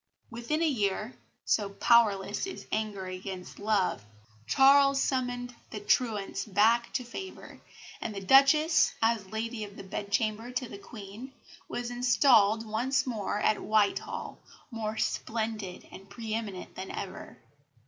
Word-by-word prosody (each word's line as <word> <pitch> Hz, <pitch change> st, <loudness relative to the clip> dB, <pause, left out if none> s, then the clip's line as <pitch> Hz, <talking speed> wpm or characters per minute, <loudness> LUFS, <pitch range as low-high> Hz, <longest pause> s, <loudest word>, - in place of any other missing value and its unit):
Within 240 Hz, +8 st, -2 dB
a -, -, +3 dB
year 200 Hz, -, -1 dB, 0.3 s
so 205 Hz, -2 st, +1 dB
powerless 205 Hz, -, +3 dB
is 380 Hz, -, -8 dB
anger 215 Hz, -3 st, -2 dB
against 185 Hz, 0 st, -7 dB
love 200 Hz, -, 0 dB, 0.4 s
Charles 275 Hz, 0 st, +5 dB
summoned 245 Hz, -2 st, -1 dB, 0.2 s
the 210 Hz, -, -6 dB
truants 205 Hz, -2 st, 0 dB
back 225 Hz, +3 st, +3 dB
to 255 Hz, -, -1 dB
favour, 375 Hz, +11 st, -9 dB, 0.4 s
and 215 Hz, -, -4 dB
the -, -, -3 dB
Duchess, 275 Hz, -, +5 dB
as 225 Hz, -3 st, +1 dB
Lady 220 Hz, +2 st, -4 dB
of 205 Hz, -1 st, -9 dB
the -, -, -8 dB
Bedchamber 215 Hz, +4 st, -2 dB
to 250 Hz, 0 st, -2 dB
the 200 Hz, -, -9 dB
Queen, 215 Hz, +5 st, -10 dB, 0.4 s
was 245 Hz, 0 st, -4 dB
installed 240 Hz, -3 st, +4 dB
once 245 Hz, +6 st, 0 dB
more 220 Hz, -5 st, -2 dB
at 215 Hz, -, +2 dB
Whitehall, 220 Hz, -, 0 dB, 0.3 s
more 220 Hz, -1 st, -4 dB
splendid 220 Hz, -6 st, -3 dB
and 195 Hz, +1 st, -12 dB
pre 220 Hz, +1 st, -6 dB
eminent 210 Hz, -5 st, -5 dB
than 190 Hz, -, -7 dB
ever. 190 Hz, -, -7 dB
220 Hz, 135 wpm, -29 LUFS, 200-245 Hz, 0.4 s, Charles